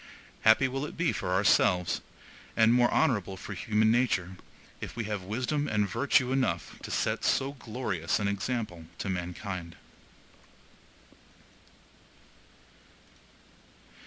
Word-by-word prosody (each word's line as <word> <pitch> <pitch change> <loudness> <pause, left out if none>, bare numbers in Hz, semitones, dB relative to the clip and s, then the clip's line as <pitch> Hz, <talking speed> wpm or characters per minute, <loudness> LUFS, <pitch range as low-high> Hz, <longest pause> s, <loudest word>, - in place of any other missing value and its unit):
Happy 110 +4 +5
will 135 +2 -3
it 150 - -6
be 170 0 +1
for - - -3
ourselves, 90 -2 +3 0.6
and 115 +1 +6
more 120 -1 +4
honorable 105 - +1
for - - -7
human 110 -1 +2
nature, 100 -7 +1 0.4
if - - -7
we 120 - -2
have 105 -2 -3
wisdom 130 +10 -2
and 105 -2 +1
virtue 130 - +2
enough 130 - -1
to - - -7
set - - -1
so 135 +1 +2
glorious 110 - -2
an 105 - 0
example 100 -4 -3
to - - -4
mankind!) 90 -1 -5
110 Hz, 115 wpm, -29 LUFS, 95-125 Hz, 0.6 s, and